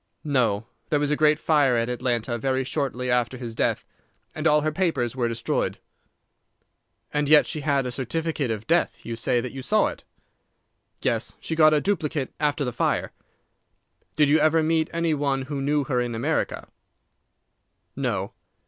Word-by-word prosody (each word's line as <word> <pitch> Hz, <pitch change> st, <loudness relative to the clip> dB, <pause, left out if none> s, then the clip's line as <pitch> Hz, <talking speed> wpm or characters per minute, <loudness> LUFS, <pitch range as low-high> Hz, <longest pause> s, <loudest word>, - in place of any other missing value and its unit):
"No; 115 Hz, -8 st, +1 dB, 0.2 s
there 150 Hz, -, +2 dB
was 145 Hz, 0 st, 0 dB
a -, -, +3 dB
great 150 Hz, 0 st, +4 dB
fire 145 Hz, -5 st, +3 dB
at 115 Hz, 0 st, +1 dB
Atlanta 120 Hz, -1 st, -1 dB
very 130 Hz, +1 st, 0 dB
shortly 130 Hz, -2 st, -2 dB
after 125 Hz, +1 st, +1 dB
his 120 Hz, -2 st, -6 dB
death, -, -, 0 dB, 0.5 s
and 155 Hz, +1 st, -1 dB
all 150 Hz, 0 st, +4 dB
her 155 Hz, +1 st, 0 dB
papers 155 Hz, -9 st, 0 dB
were 120 Hz, -2 st, 0 dB
destroyed." 115 Hz, 0 st, -1 dB, 1.4 s
"And 150 Hz, -1 st, 0 dB
yet 150 Hz, -1 st, +7 dB
she 155 Hz, -, -3 dB
had 140 Hz, -2 st, +1 dB
a 125 Hz, -, -3 dB
certificate 145 Hz, +2 st, -2 dB
of 110 Hz, -1 st, -3 dB
death. 170 Hz, +2 st, 0 dB
You 115 Hz, -, -4 dB
say 120 Hz, +1 st, 0 dB
that 125 Hz, -, -5 dB
you 135 Hz, -, -7 dB
saw 215 Hz, +11 st, +2 dB
it." -, -, -10 dB, 1.0 s
"Yes; -, -, -1 dB
she 160 Hz, -, -4 dB
got 155 Hz, -1 st, +6 dB
a -, -, +3 dB
duplicate 155 Hz, -7 st, -1 dB
after 145 Hz, -1 st, 0 dB
the 125 Hz, -, -3 dB
fire." 120 Hz, -, 0 dB, 1.0 s
"Did 150 Hz, -1 st, +4 dB
you 150 Hz, +2 st, +4 dB
ever 160 Hz, +1 st, +3 dB
meet 160 Hz, 0 st, +1 dB
any 170 Hz, -1 st, 0 dB
one 140 Hz, -2 st, 0 dB
who 140 Hz, +1 st, -4 dB
knew 145 Hz, +1 st, +1 dB
her 130 Hz, -3 st, 0 dB
in 120 Hz, -1 st, -3 dB
America?" 145 Hz, +8 st, -1 dB, 1.3 s
"No." -, -, -2 dB
140 Hz, 170 wpm, -25 LUFS, 125-155 Hz, 1.4 s, yet